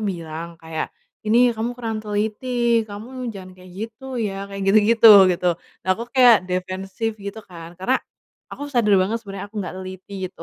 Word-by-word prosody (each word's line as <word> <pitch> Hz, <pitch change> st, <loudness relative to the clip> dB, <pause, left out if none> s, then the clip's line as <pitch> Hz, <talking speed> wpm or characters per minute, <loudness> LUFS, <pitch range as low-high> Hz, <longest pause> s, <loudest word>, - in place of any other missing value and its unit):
bilang 170 Hz, -3 st, -5 dB
kayak, 160 Hz, -1 st, -5 dB, 0.4 s
"ini 240 Hz, +2 st, +5 dB
kamu 235 Hz, +2 st, -4 dB
kurang 225 Hz, -3 st, -3 dB
teliti, 225 Hz, +3 st, 0 dB
kamu 240 Hz, +5 st, -7 dB
jangan 185 Hz, -2 st, -10 dB
kayak 185 Hz, 0 st, -15 dB
gitu 220 Hz, +5 st, -7 dB
ya" 200 Hz, -3 st, -3 dB
kayak 195 Hz, 0 st, -6 dB
gitu-gitu 215 Hz, +3 st, +6 dB, 0.2 s
gitu. 180 Hz, 0 st, 0 dB, 0.4 s
Nah 185 Hz, -, 0 dB
aku 230 Hz, +5 st, -5 dB
kayak 245 Hz, -7 st, +6 dB
defensif 190 Hz, +4 st, -3 dB
gitu 200 Hz, +2 st, -6 dB
kan, 170 Hz, -2 st, -11 dB
karena 215 Hz, +9 st, +1 dB, 0.5 s
aku 285 Hz, -, -7 dB
sadar 225 Hz, -5 st, +3 dB
banget 205 Hz, +5 st, 0 dB
sebenarnya 200 Hz, -3 st, -7 dB
aku 220 Hz, -, -12 dB
nggak 185 Hz, -, -5 dB
teliti 185 Hz, +1 st, -9 dB, 0.2 s
gitu, -, -, -13 dB
205 Hz, 165 wpm, -22 LUFS, 185-230 Hz, 0.5 s, gitu-gitu